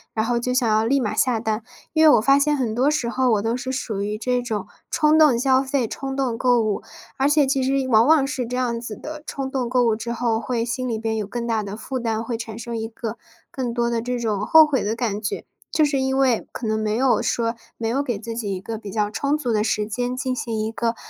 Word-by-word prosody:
然 220 0 +1
后 240 +1 +1
就 250 +1 -2
想 250 -2 +2
要 215 0 +3
立 270 +5 +2
马 215 -5 -1
下 245 -3 +2
单。 220 0 -1 0.3
因 315 - +4
为 315 - +8
我 - - +3
发 275 +4 +5
现 295 +1 +2
很 240 -5 -1
多 255 +5 +2
时 300 -5 0
候， 255 +1 +1
我 210 - +2
都 230 +1 0
是 255 +1 -4
属 225 -6 -3
于 210 +1 -2
这 250 +2 0
种 225 -4 -3 0.2
冲 305 0 +3
动 295 -7 +6
消 260 +1 +3
费、 265 -3 0
冲 270 +3 -5
动 265 -4 0
购 245 -1 +4
物。 215 -2 -1 0.4
而 275 +1 +2
且 295 -1 +4
其 270 0 +1
实 265 0 +1
往 225 0 +5
往 310 -3 +5
是 265 -3 -3
这 250 +1 -3
样 235 -2 -1
子 225 -3 -6
的 305 +4 -8
冲 270 -1 -4
动 255 -3 -1
购 250 0 +3
物 225 -2 +3
之 230 +2 -5
后， 235 -1 0
会 230 +1 -1
心 255 +1 -3
里 225 - -1
边 220 0 -2
有 210 -2 -3
更 235 +3 -4
大 225 -2 0
的 200 -1 -6
的 - - -6
负 260 +3 -4
担， 225 -1 -1
会 230 0 -3
产 225 -2 -7
生 235 0 -5
一 225 0 -3
个 225 0 -6 0.3
更 250 -3 -3
多 235 0 0
的 235 -1 -1
这 245 +1 -2
种 215 -4 -1
后 320 0 +8
悔 280 -4 0
的 215 +2 -1
感 225 -4 -2
觉。 205 - -3 0.3
就 310 - +3
是 280 -2 0
因 265 0 0
为， 260 -4 +2
可 250 - -6
能 220 0 0
没 215 0 0
有 255 +1 +3
说 230 0 0 0.2
没 225 - -2
有 265 +5 +1
给 240 -6 -2
自 230 +1 -6
己 205 -4 -2
一 185 - -6
个 225 +3 -5
比 210 -2 -8
较 210 -1 0
充 280 +7 0
足 250 -5 -2
的 210 -1 +2
时 215 -1 0
间， 245 +3 -2
进 255 0 -2
行 230 -3 -3
一 215 +1 -1
个 230 +1 -1
240 Hz, 295 characters per minute, -22 LUFS, 220-265 Hz, 0.4 s, 为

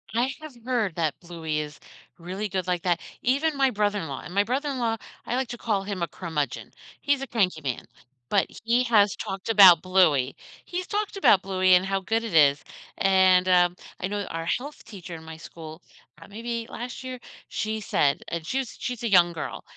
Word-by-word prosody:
I 245 +3 +2
have 310 -2 -9
heard 230 -9 0
that 160 -4 -1
Bluey 165 -3 -4
is 150 0 -6 0.4
really 185 +5 -4
good 185 -2 -2
like 180 -2 -1
that, 175 -2 +1 0.2
even 285 +4 +1
my 270 -1 +3
brother-in-law 205 - -1
and 170 - -10
my 200 +1 +3
brother-in-law, 255 -2 -1 0.3
I - - -2
like 260 -1 -1
to 240 - -6
call 210 -4 -1
him 195 -2 -5
a 170 - 0
"curmudgeon", 150 -5 -4 0.3
he's 285 -2 +1
a 270 - -4
cranky 190 -9 0
man, 130 -4 -3 0.5
but - - +2 0.2
he 235 +2 +3
has 210 -5 +4
talked 195 +2 -5
about 190 -6 +8
Bluey 165 -8 +3 0.3
he's 360 +1 -4
talked 415 -1 -2
about 200 - +5
Bluey 185 -1 +3
and 180 +1 +3
how 195 0 0
good 225 +4 -1
it 225 -5 -5
is, 145 -3 +5 0.4
and, 185 -1 +4
um, 180 -1 +4 0.2
I 185 - -2
know 205 +1 -3
our 165 0 -4
health 280 - -3
teacher 190 -6 -9
in 160 - -10
my 160 0 -8
school 160 0 -10 0.4
uh, 165 - -12
maybe 230 +2 -5
last 245 +2 -6
year? 255 -1 -6 0.3
She 220 +1 -2
said- 140 -7 +1
and 170 -2 -4
she's 265 -2 -2
she's 245 -2 -4
a 230 - -1
young 175 -2 +5
girl- 155 -2 -6
195 Hz, 195 wpm, -26 LUFS, 170-235 Hz, 0.5 s, about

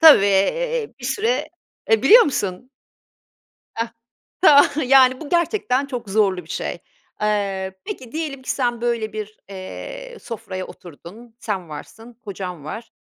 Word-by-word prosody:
Tabii, 310 -11 +9
eee, 465 - +1
bir - - -9
süre 455 +3 0 0.4
Eee 225 0 +4
biliyor 455 - +9
musun? 225 - -2 1.0
Hah, 230 0 -3 0.5
tamam, 290 -6 +8 0.2
yani 260 -1 +6
bu 310 - -7
gerçekten 340 - +1
çok 250 -6 -6
zorlu 195 -4 +2
bir 160 - -16
şey. - - -3 0.4
Eee, 195 -3 -1
peki 250 -3 -7
diyelim 300 -4 -4
ki - - -5
sen 240 -3 0
böyle 235 -2 -1
bir, 215 0 -6
eee, - - -8
sofraya 190 -5 -6
oturdun, 190 +8 -13
sen 190 -6 -3
varsın, 225 +10 -10
kocan 180 -6 -6
var, 220 +10 -7
230 Hz, 140 wpm, -22 LUFS, 195-285 Hz, 1.0 s, Tabii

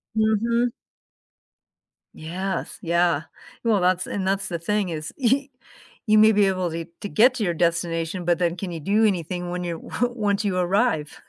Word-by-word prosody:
Mhm. 230 +2 +2 1.5
Yes, 180 +3 -4
yeah, 170 -2 +1 0.4
well, 220 -5 +2
that's 185 0 +1
and 190 -2 -3
that's 195 +1 0
the 170 -2 -4
thing 205 +1 -1
is 155 -1 -5
y 270 +2 +1 0.6
you 215 -2 +4
may 215 +1 +7
be 205 -1 +4
able 185 -2 -1
to 165 0 -4 0.2
to 205 - -5
get 245 +4 +5
to 235 - -2
your 175 -3 0
destination, 170 +1 -1
but 175 0 +2
then 170 -1 +1
can 185 -1 -5
you 165 - -5
do 205 +8 +2
anything 180 -2 -1
when 180 0 -3
you 170 -1 -3
one 245 +8 -2
once 205 -1 0
you 185 -2 0
arrive? 180 -4 0
185 Hz, 175 wpm, -24 LUFS, 170-215 Hz, 1.5 s, may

